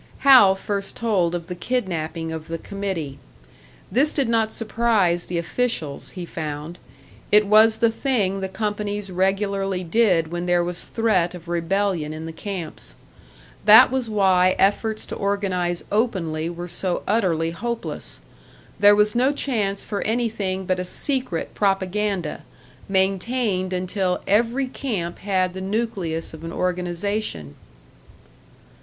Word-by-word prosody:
Hal 245 -9 +8
first 200 0 -3
told 190 -7 +1
of 170 -1 -4
the 180 - -5
kidnapping 170 -6 -3
of 160 -1 -6
the 165 - -3
committee. 185 -7 -5 0.7
This 285 +5 +3
did 275 -4 +1
not 225 -1 +1
surprise 215 -6 +1
the 175 - -3
officials, 170 - -2
he 180 - -4
found; 155 +1 -6 0.5
it 210 0 +6
was 220 +2 +5
the 230 0 +3
thing 220 -6 0
the 190 0 -3
companies 205 0 -3
regularly 195 0 0
did 175 -4 +2
when 175 +1 -3
there 175 0 +3
was 175 0 -4
threat 185 -6 +1
of 175 -1 -11
rebellion 175 -2 -1
in 160 +1 -7
the 165 - -5
camps. 185 -1 -6 0.7
That 215 +3 +9
was 260 -3 -1
why 185 -3 +3
efforts 215 +2 +1
to - - -6
organise 190 -3 -1
openly 175 -8 0
were 175 +1 -6
so 180 0 -2
utterly 175 -7 +1
hopeless. 235 +7 -5 0.6
There 205 0 +7
was 210 0 +3
no 255 +3 +3
chance 215 -9 -1
for 200 - -4
anything 210 -5 -1
but 185 0 0
a - - -1
secret 255 - -1
propaganda, 195 -3 -1 0.5
maintained 190 +1 0
until 185 0 -1
every 235 +6 +2
camp 205 -10 -4
had 185 -2 0
the 190 - -6
nucleus 190 -6 -2
of 160 0 -10
an 165 - -5
organisation. 180 - -2
195 Hz, 135 wpm, -23 LUFS, 175-215 Hz, 0.7 s, That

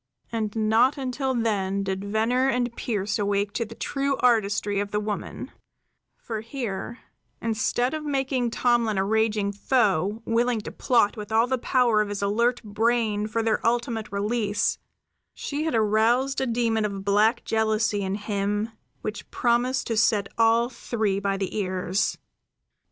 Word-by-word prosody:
And 220 -2 -2
not 225 +6 +3
until 265 0 -2
then 200 -4 0
did 190 0 -3
Venner 225 +6 +1
and 245 -2 -1
Pearse 210 -2 -2
awake 200 0 0
to 230 - -1
the 230 - -11
true 275 +2 -1
artistry 205 -4 +2
of 205 0 -2
the 210 - -1
woman; 210 -1 -5 0.7
for 220 -2 -5
here, 230 -2 -5 0.4
instead 230 +3 0
of 310 -1 -3
making 270 -3 0
of 235 - -1
Tomlin 235 -4 +2
a 190 - +1
raging 215 -1 +1
foe, 205 -2 +1
willing 235 0 +1
to - - -7
plot 230 -3 +2
with 210 0 -7
all 225 +1 +4
the 260 0 -1
power 240 -4 +3
of 210 - -2
his 205 0 -3
alert 235 +5 +1
brain 215 0 0
for 225 +1 -1
their 225 -1 0
ultimate 230 -2 -1
release, 205 +1 0 0.6
she 295 +2 -3
had 320 - 0
aroused 225 +5 +2
a 265 - 0
demon 230 -2 +1
of 200 -2 -3
black 210 +4 +3
jealousy 220 -1 +1
in 190 0 -2
him 205 +1 -2 0.3
which 215 0 -5
promised 245 +2 +1
to 230 - -1
set 210 -2 +3
all 230 +1 +4
three 220 -5 -2
by 200 0 -1
the 195 -1 -3
ears. 185 -1 -1
220 Hz, 155 wpm, -25 LUFS, 205-240 Hz, 0.7 s, all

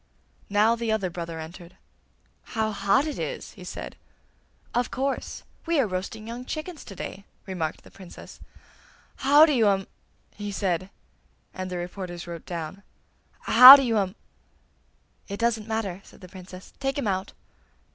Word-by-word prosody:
Now 210 +3 +3
the 230 -1 -2
other 195 -5 -1
brother 165 -1 -6
entered. 170 +2 -10 0.7
'How 220 -1 -2
hot 200 +7 +2
it 305 - -4
is!' - - -5
he - - -13
said. - - -7 0.8
'Of 245 0 0
course! 270 +2 -3 0.2
We 335 -2 +2
are 265 - +3
roasting 200 +3 -5
young 240 +2 -6
chickens 310 +4 -6
to 195 - -10
day!' 195 - -7 0.2
remarked 170 -5 -4
the - - -16
Princess. 185 -3 -13 0.8
'How 290 +3 +7
do 305 - +1
you 230 -5 +3
um!' 195 -1 +2 0.5
he 205 0 -6
said, 185 -2 -1 0.6
and 185 -1 -5
the 180 - -4
reporters 175 -1 -6
wrote 170 -2 -9
down. 170 +2 -6 0.6
'How 255 +2 +11
do 275 - +2
you 230 -4 +1
um.' 190 0 -2 1.1
'It 200 0 -6
doesn't 230 -2 0
matter!' 210 -4 -3
said - - -18
the 185 - -11
Princess. 185 0 -12
'Take 270 0 -2
him 280 - -2
out! 190 -1 -2
200 Hz, 155 wpm, -26 LUFS, 185-235 Hz, 1.1 s, How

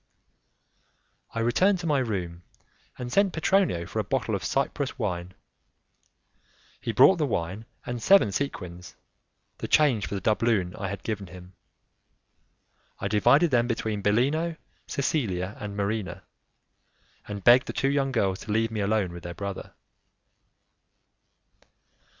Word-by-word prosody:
I 115 - 0
returned 185 - +3
to - - -6
my 150 -4 +2
room 90 -8 -3 0.6
and 125 -1 -6
sent 200 -2 +3
Petronio 160 - +1
for 105 +5 -4
a - - +1
bottle 115 +1 -1
of 100 - -2
Cyprus 140 0 -1
wine. 90 -6 -3 1.4
He 115 - -3
brought 135 +11 +6
the 150 -3 0
wine 95 +2 -3 0.2
and 120 -1 -4
seven 195 - +5
sequins, 90 -8 -5 0.6
the - - -4
change 135 -9 +3
for - - -4
the 95 - -3
doubloon 105 -3 +1
I 100 - -4
had 100 0 -6
given 105 -3 -4
him. 90 +1 -12 1.4
I 95 - -3
divided 125 - +4
them 120 -1 +3
between 110 -3 -2
Bellino, 145 +11 +1 0.3
Cecilia 105 - -1
and 105 -1 -6
Marina, 100 -3 -2 1.0
and 100 -2 -6
begged 125 +2 +6
the - - -2
two 135 - +1
young 140 -1 +1
girls 95 -6 0
to 105 - -6
leave 115 +1 +1
me 110 - -3
alone 100 -3 0
with 85 - -8
their 85 +1 -7
brother. 100 +2 -6
110 Hz, 140 wpm, -26 LUFS, 95-135 Hz, 1.4 s, brought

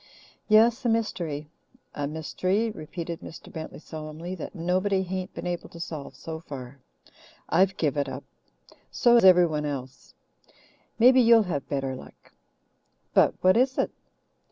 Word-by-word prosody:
"Yes, 230 +4 +5
a 240 - +1
mystery 170 -10 -2 0.5
a 145 -1 -3
mystery," 185 +8 -1
repeated 165 -1 -6
Mr. - - -11
Bentley 160 -1 -7
solemnly, 155 +3 -7
"that 185 +2 -7
nobody 185 +3 +1
hain't 185 0 -4
been - - -6
able 175 -1 -4
to 170 - -12
solve 155 -4 -6
so 160 -1 -7
far. 140 -4 -9 0.7
I've 190 +3 +3
give 150 -3 0
it 140 -1 0
up 130 +1 -7 0.7
so 240 -2 +3
has 235 - +6
everyone 175 -5 +5
else. 135 -2 -7 0.8
Maybe 255 +2 +7
you'll 230 -1 +6
have 160 -8 -4
better 135 -2 -2
luck." - - -14 0.8
"But - - +4
what 185 0 +5
is 255 +3 +2
it?" - - +1
170 Hz, 145 wpm, -26 LUFS, 150-200 Hz, 0.8 s, Maybe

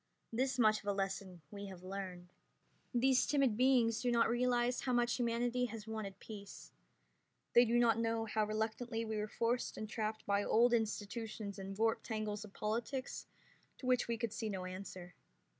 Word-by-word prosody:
This 260 +2 +1
much 215 -3 +5
of 205 - -13
a 200 - +2
lesson 190 -2 -3
we 200 0 -6
have 185 -2 -10
learned. 185 -2 -6 0.6
These 255 +1 +3
timid 275 -6 +3
beings 245 -2 +4
do 250 - +1
not 235 -1 +4
realize 245 0 +2
how 255 - 0
much 240 0 +3
humanity 240 +1 +1
has 225 -3 -6
wanted 215 -3 -5
peace. 200 -2 -9 0.8
They 240 +1 +8
do 235 +1 +2
not 230 -2 +4
know 225 0 0
how 215 0 +1
reluctantly 225 +2 -2
we 220 -1 -2
were 210 0 -1
forced 235 +3 -1
and 215 - -4
trapped 215 0 -3
by 200 0 +2
old 240 +3 +4
institutions 215 -2 -2
and 195 0 -6
warped 225 +1 +2
tangles 215 -2 -3
of 210 - -11
politics 235 +6 -3 0.5
to - - -9
which 250 -1 +3
we 235 -1 -1
could 225 -2 -2
see 220 - -3
no 190 -2 -3
answer. 185 -1 -7
220 Hz, 175 wpm, -36 LUFS, 205-240 Hz, 0.8 s, They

